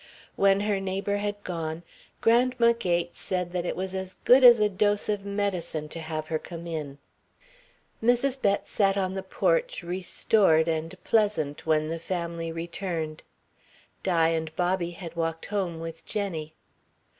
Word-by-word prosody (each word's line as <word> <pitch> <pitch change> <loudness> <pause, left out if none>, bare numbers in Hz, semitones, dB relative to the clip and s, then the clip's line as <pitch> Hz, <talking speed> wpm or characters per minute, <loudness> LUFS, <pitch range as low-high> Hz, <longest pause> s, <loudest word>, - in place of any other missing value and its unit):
When 195 0 +4
her 205 -1 0
neighbour 195 +1 -1
had 205 0 -3
gone, 165 -1 -4 0.4
Grandma 235 0 +4
Gates 175 -6 -1
said 180 -2 -2
that 180 -1 -2
it - - -2
was 190 0 -3
as 190 0 -5
good 255 +2 +7
as 240 -2 +9
a 210 - +4
dose 205 +1 +1
of 200 -1 -1
medicine 180 -6 -2
to 165 - -7
have 155 -1 -5
her 160 -1 0
come 170 0 -9
in. 150 -4 -5 1.1
Mrs. 245 +3 +2
Bett 200 0 +1
sat 195 -2 +2
on 190 -1 0
the 190 - -3
porch - - 0
restored 175 -1 +2
and 160 0 -2
pleasant 205 -11 +1
when 155 -1 +2
the 165 0 -3
family 170 -1 -3
returned. 165 -1 -4 0.8
Di 165 -3 +3
and 160 -1 -2
Bobby 180 -1 0
had 170 -1 -9
walked 165 -1 -2
home 180 -5 -1
with 165 0 -7
Jenny. 165 -7 -4
180 Hz, 155 wpm, -27 LUFS, 165-205 Hz, 1.1 s, as